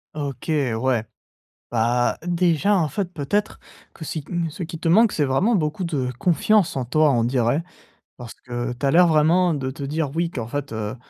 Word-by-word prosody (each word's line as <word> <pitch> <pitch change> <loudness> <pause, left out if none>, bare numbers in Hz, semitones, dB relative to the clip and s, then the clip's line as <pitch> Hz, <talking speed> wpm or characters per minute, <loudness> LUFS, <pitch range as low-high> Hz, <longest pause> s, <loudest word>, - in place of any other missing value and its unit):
OK, 140 -3 -5
ouais. 130 -5 0 0.7
Bah, 120 +1 +1
déjà 175 +2 +2
en 165 -5 +1
fait 190 +6 -2
peut-être 200 +9 -2 0.4
que 160 - -9
si, 155 0 -4
mmh 170 -2 -2
ce 175 - -7
qui 165 0 -6
te 165 - -2
manque 215 +5 +5
c'est 150 - +1
vraiment 180 - +2
beaucoup 160 0 -1
de 140 -7 -2
confiance 180 +4 +2
en 130 - -1
toi, 155 +5 +3
on 115 -2 +2
dirait 125 +4 +1 0.5
parce 120 -2 -9
que 120 0 -5
tu 130 +3 -3
as - - +3
l'air 175 +4 +6
vraiment 165 +3 +3
de 135 -2 -3
te 140 - -9
dire 145 +1 -2
oui, 170 0 0
qu'en 120 -8 -5
fait, 140 +1 -5
heu, 110 +1 -4
150 Hz, 195 wpm, -22 LUFS, 125-170 Hz, 0.7 s, l'air